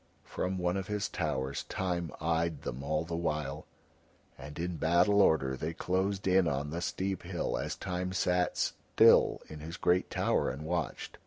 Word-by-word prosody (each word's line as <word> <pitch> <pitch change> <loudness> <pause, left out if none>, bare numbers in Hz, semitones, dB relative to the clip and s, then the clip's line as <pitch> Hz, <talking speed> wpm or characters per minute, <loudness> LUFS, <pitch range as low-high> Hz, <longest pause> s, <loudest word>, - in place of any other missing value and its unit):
From 95 +1 -3
one 90 +1 0
of 95 -1 -4
his 105 -1 -1
towers 65 +1 -2
Time 90 -3 -2
eyed 80 -1 0
them 65 - -4
all 75 +3 -1
the 85 0 -4
while, 75 -4 -2 0.7
and 75 +3 -10
in 85 0 -3
battle 90 +6 +4
order 70 -8 +3
they 80 +5 -4
closed 95 +3 -1
in 95 -1 +4
on 75 0 -1
the 85 +2 -3
steep 95 +1 -2
hill - - -2
as - - -3
Time 90 -1 -3
sat 90 -1 +1
still - - +4
in 75 - -9
his 80 +3 -7
great 90 +1 +2
tower - - +1
and 70 +4 -5
watched. 85 -2 -3
85 Hz, 170 wpm, -31 LUFS, 75-90 Hz, 0.7 s, battle